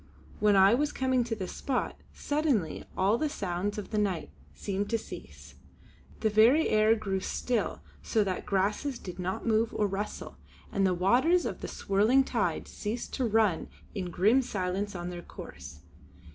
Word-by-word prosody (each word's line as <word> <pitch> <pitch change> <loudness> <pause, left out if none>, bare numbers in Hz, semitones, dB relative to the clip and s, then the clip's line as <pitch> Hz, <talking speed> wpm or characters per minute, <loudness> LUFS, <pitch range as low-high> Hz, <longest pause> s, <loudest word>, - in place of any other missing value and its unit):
When 210 -1 +4
I 195 +2 +7
was 295 +4 +1
come 260 -1 +1
to 230 -1 -3
this 190 -4 -5
spot, 265 -3 -2 0.2
suddenly 285 - -1
all 200 +5 +3
the 310 0 0
sounds 200 -5 -3
of 210 - -6
the 215 - +1
night 195 -5 -1 0.2
seemed 200 0 -3
to 230 - +2
cease. 225 - -10 0.7
The 220 - +3
very 235 +9 +5
air 215 +1 +4
grew 195 -3 -2
still 240 +5 -2 0.2
so 220 -3 +1
that 190 -2 -1
the - - -7
grasses 210 +8 0
did 180 -4 -9
not 185 +1 -3
move 225 0 +2
or 210 - +2
rustle, 200 +1 -4 0.3
and 195 -1 +2
the 180 - +1
waters 255 - +3
of - - -4
the - - -4
swirling 215 +7 +3
tide - - -1
ceased 225 +3 -5
to 260 - 0
run 215 -6 +2 0.3
in 185 -4 -3
grim 210 +10 +4
silence 200 -3 -2
on 175 0 -4
their 175 -1 -6
course. - - -10
210 Hz, 170 wpm, -29 LUFS, 190-240 Hz, 0.7 s, I